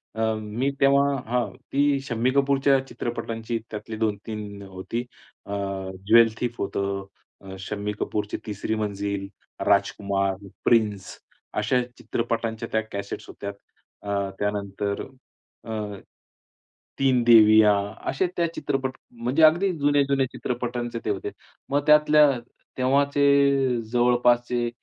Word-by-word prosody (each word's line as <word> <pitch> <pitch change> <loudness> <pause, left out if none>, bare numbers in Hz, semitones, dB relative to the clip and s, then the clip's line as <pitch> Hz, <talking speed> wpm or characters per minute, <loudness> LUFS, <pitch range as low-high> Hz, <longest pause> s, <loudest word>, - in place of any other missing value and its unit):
अ, 110 - -3 0.2
मी 115 +6 -1
तेव्हा 140 0 +5 0.2
हं. 120 -4 0
ती 140 0 +1
शम्मी 125 -1 0
कपूरच्या 140 0 +3
चित्रपटांची 115 -1 -4
त्यातली 110 +1 -6
2-3 105 -1 -3
होती. 95 +5 -5 0.4
अ, - - -9 0.6
ज्वेल 115 -1 +6
थीफ 120 -1 -1
होतं, 100 0 -2 0.4
अ, 95 -1 -9
शम्मी 105 +1 -4
कपूरची 105 -1 -2
तिसरी 105 +2 -2
मंजिल, 100 -2 -3 0.4
राजकुमार, 100 -1 +1 0.3
प्रिन्स 105 -5 +2 0.5
अशा 125 +4 +2 0.2
चित्रपटांच्या 115 -1 -2
त्या 110 - +3
कॅसेट्स 100 0 -5
होत्या. 100 - -6 0.5
अ, 100 -1 -1
त्यानंतर 100 0 -2 0.6
अ, 105 -3 -5 1.0
तीन 130 -3 +3
देविया 110 -2 +7 0.4
असे 180 +7 +1
त्या 170 -1 +2
चित्रपट 135 -2 -2 0.2
म्हणजे 125 +6 0
अगदी 175 +5 +5
जुने-जुने 140 -2 +2
चित्रपटांचे 120 -1 -3
ते - - -1
होते. 100 -2 -2 0.4
मग 145 +1 0
त्यातल्या 150 -1 +6 0.5
तेव्हाचे 140 -1 +3
जवळपासचे 120 0 +2
115 Hz, 110 wpm, -25 LUFS, 105-135 Hz, 1.0 s, देविया